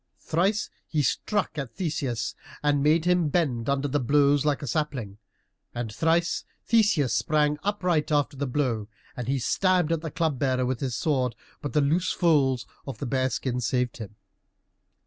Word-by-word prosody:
Thrice 195 +6 0 0.2
he 150 -3 0
struck 205 - -1
at 135 -5 -6
Theseus 145 - -2 0.3
and 145 -1 +2
made 155 +3 +3
him 180 -3 +3
bend 140 -8 0
under 140 +1 +1
the 145 +1 0
blows 140 +2 +3
like 150 -1 0
a - - -2
sapling. 120 -7 -2 0.6
And 120 -3 -4
thrice 165 +4 +1 0.2
Theseus 210 - +3
sprang 150 -1 +1
upright 180 -6 0
after 145 -1 +1
the 140 +1 -2
blow, 120 -6 -1 0.3
and 125 -2 -5
he 135 +1 +1
stabbed 180 +6 +2
at 165 -2 0
the 160 - -4
Club 150 -3 -1
bearer 130 -2 +1
with 125 -1 -1
his 130 -4 -2
sword, 130 -2 0 0.3
but 145 - -4
the 150 - +3
loose 165 +6 +1
folds 135 -7 +2 0.2
of 135 -5 -5
the 140 - -4
bear 130 +1 +1
skin 125 -1 -2
saved 125 +1 0
him. 105 -2 -8
145 Hz, 170 wpm, -26 LUFS, 125-160 Hz, 0.6 s, made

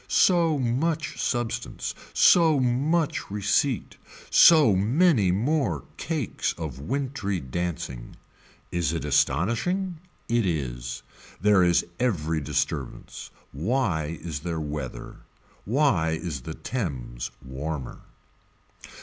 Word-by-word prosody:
So 170 -4 +4
much 155 +7 -1
substance, 120 -2 -2 0.2
so 160 -5 +5
much 140 +6 0
receipt, 105 +4 0 0.3
so 150 - +7
many 115 - +3
more 110 - 0
cakes 155 - -2
of 80 -6 -5
wintry 130 - -2
dancing. 65 -4 -5 0.6
Is 85 -3 0
it 80 - -3
astonishing. 120 - +1 0.3
It 120 0 +2
is. 60 -8 -3 0.4
There 105 0 +4
is 85 -1 +3
every 80 -10 0
disturbance. 70 -1 -3 0.2
Why 85 - -1
is 75 -3 -5
there 85 +1 -3
whether. 75 -4 -6 0.5
Why 105 - +2
is 80 -6 -4
the 80 +6 -7
Thames 65 - -4 0.2
warmer. 65 +1 -5
95 Hz, 100 wpm, -26 LUFS, -, 0.6 s, so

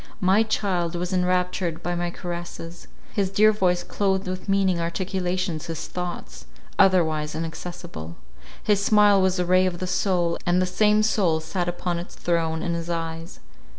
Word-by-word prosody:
My 190 +3 +4
child 185 -6 0
was 180 +2 -3
enraptured 180 -2 0
by 175 - -1
my 175 0 -1
caresses; 175 -1 -7 0.3
his 195 -2 0
dear 215 +2 +5
voice 180 -4 +1
cloathed 190 -1 0
with 185 +1 -5
meaning 195 -3 +2
articulations 180 -1 -2
his 165 -2 -4
thoughts, 180 -1 -6 0.3
otherwise 160 -6 +3
inaccessible; 165 - -6 0.5
his 205 -1 +2
smile 205 -1 +5
was 190 0 +2
a 180 - 0
ray 185 +1 +4
of 175 -1 -3
the 185 - -3
soul, 180 -2 0
and 175 +1 +2
the 185 - +2
same 210 +3 +3
soul 190 -7 +2
sat 175 +2 -2
upon 175 0 -2
its 175 - -9
throne 165 -2 -1
in 170 - -1
his 170 0 -4
eyes. 165 0 -4
180 Hz, 160 wpm, -24 LUFS, 170-190 Hz, 0.5 s, dear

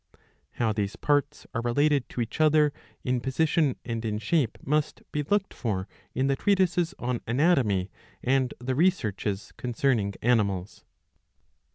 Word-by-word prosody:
How 115 -3 0
these 105 -1 -2
parts 145 -1 0
are 115 - -1
related 140 +3 +2
to 125 - -3
each 115 +6 -3
other, 150 -1 +4 0.3
in 125 -2 0
position 150 +1 +1
and 115 -1 -3
in 105 -2 -1
shape, 115 +3 0
must 150 +2 0
be 150 - -1
looked. 195 +7 0
for 100 -5 -2 0.3
in 130 - +1
the 135 0 +2
treatises 185 0 +2
on 125 -1 -2
Anatomy 115 - +2 0.3
and 130 0 +2
the 125 +2 -2
Researches 110 - 0
concerning 120 -5 0
Animals."" 100 -6 +1
130 Hz, 140 wpm, -27 LUFS, 110-150 Hz, 0.3 s, other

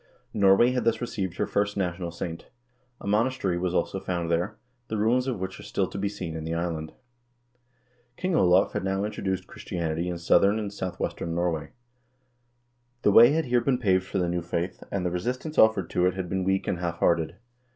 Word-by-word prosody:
Norway 100 +4 +5
had 125 -2 0
thus 115 0 +2
received 95 -7 -3
her - - +1
first 100 0 -1
national 90 -2 -2
saint. 85 0 -6 0.5
A - - -11
monas 115 +6 +1
tery 90 -3 0
was 90 0 -1
also 95 - 0
founded 85 -3 -2
there, 90 +6 0 0.3
the 110 - -3
ruins 120 +5 +2
of 125 -7 -2
which 95 0 -5
are - - -8
still 95 - -1
to 95 - -7
be 100 0 0
seen 90 -5 -6
in 80 - -5
the 80 +1 -3
island.1 85 -2 -3 1.2
King 185 -1 -1
Olav 90 - +4
had - - -2
now 95 +1 0
introduced 95 -3 -2
Christianity 85 -1 -3
in 90 - -3
southern 100 +4 +4
and 105 -2 -4
south 90 -3 -5
western 85 0 -3
Norway. 85 -3 -1 1.3
The 105 - +5
way 120 +6 +8
had 160 0 +1
here 120 -1 +2
been 125 +1 +1
paved 95 -5 +1
for - - -3
the 90 -2 +1
new 90 0 -1
faith, 85 +1 -3
and 95 -2 -1
the 90 - 0
resistance 125 - -2
offered 110 -3 +5
to 90 0 +2
it 90 - 0
had 95 -2 -3
been 95 -1 -1
weak 95 +1 0
and 90 - -1
half 85 -1 -2
hearted. 85 -2 +1
95 Hz, 205 wpm, -26 LUFS, 85-105 Hz, 1.3 s, way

